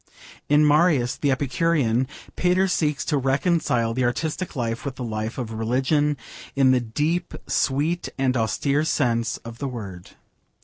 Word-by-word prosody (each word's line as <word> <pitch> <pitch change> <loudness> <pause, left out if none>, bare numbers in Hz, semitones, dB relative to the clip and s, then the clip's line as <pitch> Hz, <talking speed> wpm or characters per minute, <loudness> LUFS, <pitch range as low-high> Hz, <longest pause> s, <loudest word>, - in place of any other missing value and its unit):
In 150 +1 +5
Marius 150 -5 +3
the 145 - 0
Epicurean 130 -2 +1 0.3
Pater 180 +2 +2
seeks 150 -5 0
to 145 - +1
reconcile 135 -4 +1
the 130 +2 0
artistic 155 +8 -2
life 115 -3 -2
with 135 -2 -4
the 130 - -6
life 110 0 -4
of 120 -4 -4
religion, 135 +7 +1 0.4
in 135 -1 +5
the 130 -1 +3
deep, 150 +10 -1
sweet, 150 +6 0
and 130 -1 +1
austere 140 +5 +1
sense 120 -5 0
of 115 0 -9
the 140 - -2
word. 100 -8 -8
135 Hz, 145 wpm, -24 LUFS, 120-150 Hz, 0.4 s, In